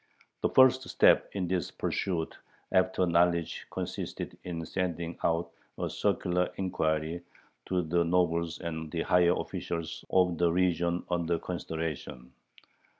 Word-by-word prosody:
The - - +2
first 130 0 +5
step - - +5
in 95 -3 -2
this 90 -2 -1
pursuit 85 -4 -2 0.4
after 95 0 +3
knowledge 85 -1 +1
consisted - - -5
in 85 -2 -4
sending 85 -1 -2
out 85 +1 +1 0.3
a - - -2
circular 90 0 0
inquiry 80 -2 -1 0.5
to 90 -1 +1
the 85 +2 +2
nobles 85 -1 +1
and 80 -2 -4
the 85 -1 -1
higher 90 0 +4
officials 85 -1 -4
of 90 -3 +3
the 85 -1 +3
region 85 -1 +1
under 85 -1 +1
consideration. 80 -7 -5
85 Hz, 125 wpm, -30 LUFS, 80-90 Hz, 0.5 s, first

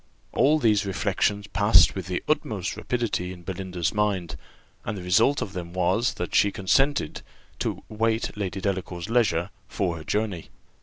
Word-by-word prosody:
All 150 +3 +4
these 110 -7 +3
reflections 100 +1 0
passed - - +5
with - - -5
the - - -2
utmost - - -1
rapidity 115 -7 -2
in 90 -1 -10
Belinda's 90 -2 -3
mind, 100 -7 0 0.5
and 105 - -4
the 90 - -7
result 110 +10 +3
of 95 - -8
them 85 -2 -6
was, 115 +8 +1
that - - -4
she 100 - +4
consented 135 - +1 0.4
to - - -3
wait 110 +1 -1
Lady 100 -2 -3
Delacour's 95 -1 -3
leisure 100 -7 +2 0.2
for 90 -4 -2
her 80 - -8
journey. 100 0 -2
100 Hz, 155 wpm, -25 LUFS, 90-110 Hz, 0.5 s, passed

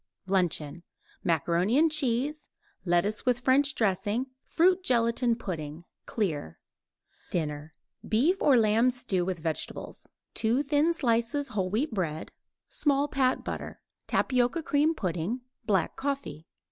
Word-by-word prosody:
LUNCHEON 175 -5 0 0.4
Macaroni 170 - +1
and 320 +1 +4
cheese; 290 +1 -1 0.4
lettuce 175 +5 +1
with 245 -1 +1
French 280 +3 +3
dressing; 215 +3 0 0.2
fruit 365 +2 +3
gelatine 235 -2 +2
pudding 165 -6 -6 0.2
(clear). 155 - -2 0.7
DINNER 150 -2 -3 0.3
Beef 300 - +2
or 275 -4 +5
lamb 225 +2 +4
stew 225 -7 -1
with 185 0 -2
vegetables; 160 -1 -5 0.2
2 235 +5 +1
thin 295 +3 +2
slices 240 +1 0
whole 190 -3 -1
wheat 230 +7 -1
bread; 165 -6 -3 0.4
small 285 -1 +1
pat 260 -2 +1
butter; - - -6 0.3
tapioca 255 +6 +1
cream 300 +3 +2
pudding; 185 - -2 0.3
black 195 -6 +1
coffee. 275 - -4
230 Hz, 120 wpm, -28 LUFS, 180-275 Hz, 0.7 s, or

